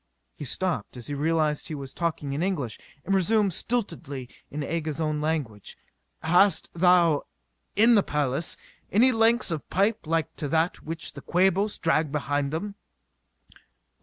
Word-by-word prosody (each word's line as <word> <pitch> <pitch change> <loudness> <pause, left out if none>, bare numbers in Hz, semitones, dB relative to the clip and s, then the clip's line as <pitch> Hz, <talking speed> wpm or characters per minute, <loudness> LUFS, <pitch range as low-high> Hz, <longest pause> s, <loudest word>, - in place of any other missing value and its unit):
He 145 - -7
stopped 155 - -2
as 120 - -6
he 145 - -3
realized 155 0 0
he 155 - -5
was 135 -2 -7
talking 155 -5 -2
in 145 - -2
English, 155 - -2 0.3
and 195 - 0
resumed 200 +1 +3
stiltedly 165 - -3 0.2
in 150 0 -4
Aga's 155 -1 -3
own 155 -2 -1
language. 145 -10 -3 0.5
"Hast 180 +5 +3
thou, 170 -3 +4 0.5
in 230 +3 +6
the 210 - +6
palace, 150 -1 -1 0.3
any 245 +6 +5
lengths 225 -2 +3
of 160 -3 -4
pipe 200 0 +1
like 165 -2 -1
to 150 - -3
that 160 +4 0
which 160 0 -6
the - - -9
Quabos 190 +3 +2
drag 160 -2 +1
behind 145 -1 -1
them?" 200 +6 -3
160 Hz, 150 wpm, -26 LUFS, 145-190 Hz, 0.5 s, in